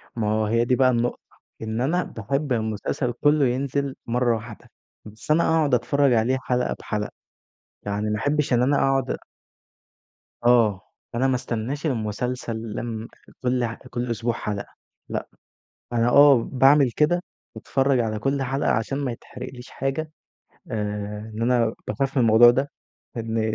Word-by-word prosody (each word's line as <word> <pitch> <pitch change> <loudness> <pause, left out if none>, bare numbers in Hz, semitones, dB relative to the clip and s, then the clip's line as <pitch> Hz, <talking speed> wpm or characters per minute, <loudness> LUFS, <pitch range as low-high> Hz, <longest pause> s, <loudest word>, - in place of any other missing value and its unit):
ما 105 -2 0
هو 110 0 +1
هي 115 +2 +2
دي 125 - +2
بقى 130 0 +4
النقطة، 120 0 0 0.4
إن 110 +1 -3
أنا 170 +7 +1
باحب 135 +5 -2
المسلسل 110 +3 -2
كلّه 145 +3 +3
ينزل 135 +2 -1
مرّة 120 0 +2
واحدة، 110 0 -9 0.4
بس 110 +7 -6
أنا 165 +2 +4
اقعُد 155 -4 +2
اتفرّج 135 +3 +3
عليه 120 +3 +2
حلقة 125 0 0
بحلقة، 105 -1 -3 0.7
يعني 105 +1 -2
ما 105 0 -1
احبش 145 0 0
إن 120 - +3
أنا 140 +2 +3
اقعُد 135 -2 +1
أ - - 0 1.3
آه، 115 -5 +4 0.3
أنا 130 +3 +2
ما 130 - +2
استناش 125 +5 -3
المسلسل 120 -1 -2 0.2
لمّا 115 -1 -4 0.4
كل 125 -1 +1
ح 115 - -3 0.2
كل 120 0 -3
أسبوع 115 +1 -1
حلقة 105 -3 -5 0.4
لأ، - - -3 0.7
أنا 120 0 +2
آه 140 -1 +7
باعمل 135 0 +5
كده 175 +4 +2 0.3
باتفرّج 135 +3 +1
على 110 -2 -1
كل 135 +5 0
حلقة 135 +2 0
عشان 115 +5 0
ما 140 -4 -2
يتحرقليش 125 +2 -10
حاجة 135 +4 -3 0.6
آآ، 105 0 -4
إن 110 - -4
أنا 120 -2 +2
باخاف 135 0 -2
من 130 - +4
الموضوع 115 +1 +7
ده، 135 +4 -1 0.5
إن 115 -1 -2
120 Hz, 155 wpm, -24 LUFS, 110-135 Hz, 1.3 s, آه